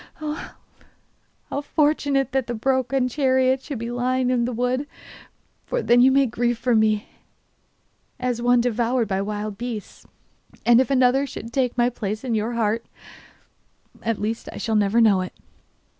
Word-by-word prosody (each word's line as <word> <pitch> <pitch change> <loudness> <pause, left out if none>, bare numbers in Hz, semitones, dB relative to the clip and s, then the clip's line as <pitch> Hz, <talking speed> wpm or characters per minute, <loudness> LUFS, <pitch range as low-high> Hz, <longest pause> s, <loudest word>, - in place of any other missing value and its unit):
Ah, 305 +1 -6 0.9
how 285 - -2
fortunate 285 -3 +1
that 265 -2 0
the 240 - -3
broken 260 +2 +1
chariot 260 0 +2
should 280 -2 -6
be 235 +1 -5
lying 250 +1 0
in 240 -2 +1
the 250 - -2
wood, 250 +4 -1 0.8
for - - -2
then 240 +1 +5
you 260 +1 +6
may 275 +1 +4
grieve 240 0 -1
for 245 +1 0
me 215 -1 +2 1.1
as 250 -2 -2
one 245 0 +4
devoured 240 0 0
by 195 -1 -1
wild 210 0 -4
beasts. 235 -4 -7 0.6
And 240 +1 +6
if 260 - -1
another 265 +1 +3
should 230 -2 -8
take 250 -2 0
my 240 0 +3
place 215 -1 -4
in 250 -3 -2
your 220 +2 -1
heart 230 0 0 1.1
Well, - - -6
at 225 - 0
least 225 +2 -3
I - - -9
shall 225 - -1
never 210 +2 +3
know 205 -4 +4
it. 185 - -6
245 Hz, 165 wpm, -23 LUFS, 225-260 Hz, 1.1 s, you